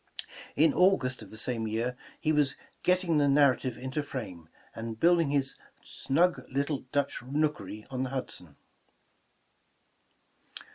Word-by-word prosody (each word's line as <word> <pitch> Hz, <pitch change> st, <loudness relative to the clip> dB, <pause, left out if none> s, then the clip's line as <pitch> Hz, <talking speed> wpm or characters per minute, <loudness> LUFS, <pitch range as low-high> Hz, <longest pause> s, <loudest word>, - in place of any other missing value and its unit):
In 155 Hz, +3 st, +5 dB
August 180 Hz, -10 st, +3 dB
of 105 Hz, -, -11 dB
the 110 Hz, -, -8 dB
same 115 Hz, 0 st, 0 dB
year, 115 Hz, +3 st, -1 dB, 0.2 s
he 155 Hz, -, +1 dB
was 145 Hz, -3 st, +2 dB, 0.3 s
''getting 180 Hz, -3 st, +3 dB
the 145 Hz, -, +3 dB
narrative 135 Hz, -3 st, +3 dB
into 130 Hz, +4 st, -3 dB
frame," 95 Hz, -, -7 dB, 0.3 s
and 115 Hz, 0 st, -6 dB
build 175 Hz, 0 st, +5 dB
ing 155 Hz, -, 0 dB
his 140 Hz, -1 st, 0 dB, 0.3 s
''snug 175 Hz, +6 st, +1 dB
little 140 Hz, 0 st, -1 dB
Dutch 145 Hz, -1 st, 0 dB
nookery" 130 Hz, -6 st, -2 dB
on 130 Hz, -1 st, -2 dB
the 130 Hz, -, -1 dB
Hudson. 90 Hz, -, -6 dB
135 Hz, 135 wpm, -29 LUFS, 115-150 Hz, 0.3 s, In